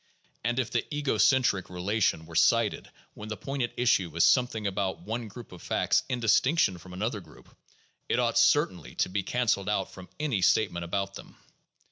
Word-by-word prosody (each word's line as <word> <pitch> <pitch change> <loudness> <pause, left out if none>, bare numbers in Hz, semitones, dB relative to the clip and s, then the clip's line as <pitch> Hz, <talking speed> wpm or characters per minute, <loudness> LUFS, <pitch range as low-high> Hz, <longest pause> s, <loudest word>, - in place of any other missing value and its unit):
And 120 +3 -1
if 130 -3 -1
the 120 - 0
'ego 145 -7 -1
centric' 115 -4 +3
re 90 -1 -8
lation 95 -4 0
were 85 - -13
cited 80 - +2 0.2
when 105 +1 -9
the 110 - -4
point 135 0 -4
at 120 - -2
issue 95 -9 +1
is 85 - +3
something 125 -4 +2
about 95 -1 -2
one 115 +1 -4
group 115 +2 -11
of 90 - -12
facts - - +1
in 125 - -1
distinction 115 - +2
from 90 +1 -12
another 105 +3 -3
group, 80 -4 -18 0.5
it - - +1
ought - - +2
certainly 90 -4 +2
to - - 0
be 100 +2 -1
canceled 105 -2 0
out 100 -3 -1
from 95 -1 -12
any 140 -10 -1
statement 85 -2 +2
about 100 +2 -2
them. - - -12
105 Hz, 190 wpm, -28 LUFS, 95-120 Hz, 0.5 s, centric